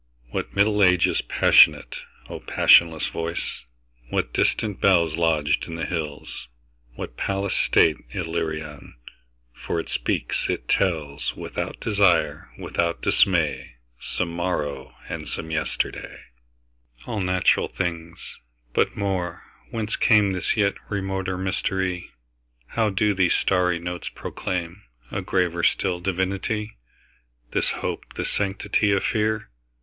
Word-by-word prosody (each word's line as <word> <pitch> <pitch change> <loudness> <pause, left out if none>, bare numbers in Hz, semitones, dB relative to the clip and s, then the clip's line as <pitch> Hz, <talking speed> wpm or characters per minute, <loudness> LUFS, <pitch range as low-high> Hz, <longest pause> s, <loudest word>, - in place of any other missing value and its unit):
What - - -4
Middle 105 +1 +4
Ages 90 -2 +4
passionate,O - - +3
passionless 80 -2 +5
voice! 85 0 -4 0.5
What - - -1
distant 105 -3 0
bellsLodged 80 -4 +2
in 80 - -6
the 80 - -3
hills, 75 -6 -5 0.5
what - - -7
palace 100 0 -1
stateIllyrian! 75 +2 0 0.6
For 85 - -3
it - - -5
speaks, - - -1
it - - -2
tells, 80 -7 0
Without - - -5
desire, 100 -5 +2
without 85 -1 -2
dismay, 85 -9 +2 0.2
Some 90 +6 -2
morrow 75 -6 -3
and - - -5
some 80 - -4
yesterday. 80 -1 -3 0.8
All 105 - -3
natural 90 0 +2
things! 85 -2 -5 0.3
But - - +1
more—Whence 100 +3 -4
cameThis 100 -5 +3
yet 100 -3 +2 0.2
remoter 95 -2 -2
mystery? 95 -1 -2 0.6
How 110 -2 +1
do 105 +1 +2
these 95 -2 +3
starry 90 -2 +2
notes 90 +1 -5
proclaimA 85 -1 -4 0.5
graver 90 -2 0
still 90 0 +1
divinity? 95 - -2 0.7
This - - +1
hope, - - -4
this - - -2
sanctity 100 +1 0
of 100 - +1
fear? 110 - 0
90 Hz, 105 wpm, -24 LUFS, 85-100 Hz, 0.8 s, passionless